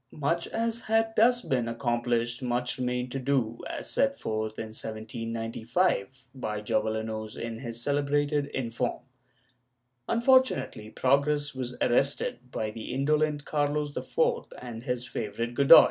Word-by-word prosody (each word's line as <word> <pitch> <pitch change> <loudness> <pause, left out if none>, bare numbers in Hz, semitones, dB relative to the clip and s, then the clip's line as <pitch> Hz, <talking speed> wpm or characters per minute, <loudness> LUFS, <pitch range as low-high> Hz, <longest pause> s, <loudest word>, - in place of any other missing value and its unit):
^ - - -13
Much 165 +4 0
as 230 0 -1
had 225 0 +1
thus 245 +2 +5
been 125 -3 0
accomplished, 120 0 0
much 125 0 -1
remained 125 0 -1
to 135 - -2
do, 125 -4 0
as - - -5
set 275 0 +1
forth, 110 0 -2
in 110 - -4
1795, 115 - -2
by 110 -5 -3
Jovellanos 110 0 -2
in 115 -1 -4
his 115 -2 -6
celebrated 145 +1 +1
''Informe." 120 -1 -2 1.1
Unfortunately 230 - +3
progress 145 +4 +2
was 125 -1 -4
arrested 135 0 +2
by 110 -3 -2
the 110 0 -6
indolent 150 +2 +1
Carlos 145 0 0
IV - - -7 0.4
and 120 -2 -7
his 125 -2 -1
favorite 115 +1 -3
Godoy. 140 +2 +10
125 Hz, 130 wpm, -28 LUFS, 115-145 Hz, 1.1 s, Godoy